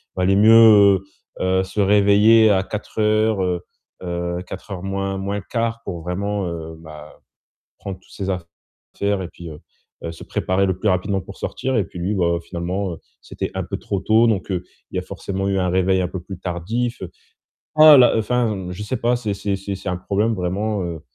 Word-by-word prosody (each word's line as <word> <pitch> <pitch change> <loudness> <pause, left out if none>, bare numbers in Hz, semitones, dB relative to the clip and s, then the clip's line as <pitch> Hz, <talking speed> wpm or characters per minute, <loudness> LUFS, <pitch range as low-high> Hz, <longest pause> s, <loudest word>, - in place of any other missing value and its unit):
valait 95 +1 +2
mieux, 105 +3 +6
heu, 105 -4 +7 0.4
heu, 95 0 +2
se 95 +3 -6
réveiller 105 +3 +5
à 95 -1 +2
4:00, 110 +1 0
heu, 90 -1 -1 0.4
heu, 85 0 -3
3:45 100 +4 -3
pour 85 -4 -5
vraiment, 100 +3 -2
heu, 80 -1 -6
bah, 75 -2 -12 0.6
prendre 95 -2 -7
toutes - - -24
ses 95 -1 -4
affaires 95 +3 -4
et 90 - -4
puis, 85 -1 -10
heu, 75 -1 -10 0.4
heu, 85 - -4
se 85 - -11
préparer 95 +1 0
le 95 -2 -1
plus 105 +3 0
rapidement 95 +1 0
pour - - -12
sortir 130 0 -3
et 105 - +2
puis 90 - -10
lui, 95 +4 -1
bah, 85 -2 +1
finalement, 90 +3 -3
heu, - - -9 0.2
c'était - - -5
un - - -2
peu - - -5
trop 100 - -3
tôt, 110 +2 +4
donc 100 -3 -1
heu, 90 -1 -2 0.3
il - - -1
a - - -4
forcément 95 0 -4
eu 95 - 0
un 90 -1 0
réveil 95 +1 +2
un 90 - 0
peu 95 - -6
plus 95 +1 -8
tardif. 105 +8 -3 0.7
Ah 155 -1 +9
là 125 -2 +6
enfin, 115 0 0
mmh, 90 -2 -6
je 100 +4 -6
sais 125 +5 -3
pas, 120 +2 +1
c'est 110 -4 -3
c'est 100 0 -2
c'est 100 +1 -5
c'est 95 0 -6
un 90 - -2
problème 100 +5 0
vraiment, 100 +3 -2
heu, 85 -3 -5
95 Hz, 195 wpm, -21 LUFS, 90-105 Hz, 0.7 s, Ah